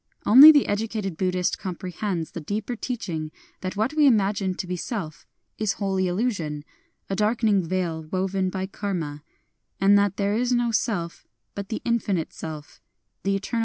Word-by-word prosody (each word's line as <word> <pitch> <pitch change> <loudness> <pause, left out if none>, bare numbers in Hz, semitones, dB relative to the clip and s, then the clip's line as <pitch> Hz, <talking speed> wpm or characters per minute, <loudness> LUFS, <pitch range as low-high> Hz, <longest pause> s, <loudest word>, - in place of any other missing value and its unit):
Only 275 +8 +11
the 290 -3 +4
educated 205 -3 -2
Buddhist 180 0 0
comprehends 185 -1 -4
the 170 - -6
deeper 205 +8 -3
teaching 180 -11 -4 0.3
that 185 +1 -5
what 220 +7 0
we 305 -2 +5
imagine 200 -5 +2
to 190 - -4
be 180 0 -3
SeK 175 -4 -5 0.3
is 215 -2 +1
wholly 190 -2 -1
illusion, 175 -7 -2 0.2
— - - -44
a - - 0
darkening 215 -1 +2
veil 170 -2 -2
woven 190 0 0
by 190 0 -3
Karma; 175 -7 -4 0.6
and 200 +1 +5
that 200 0 0
there 200 0 0
is 245 +2 +1
no 240 -1 +1
Self 195 -7 -2 0.3
but 200 -1 -6
the 220 - -4
Infinite 205 -8 -1
Self, 155 -2 -8 0.4
the 195 0 0
eternal - - +2
Absolute. 230 +4 -3
195 Hz, 165 wpm, -25 LUFS, 180-215 Hz, 0.6 s, Only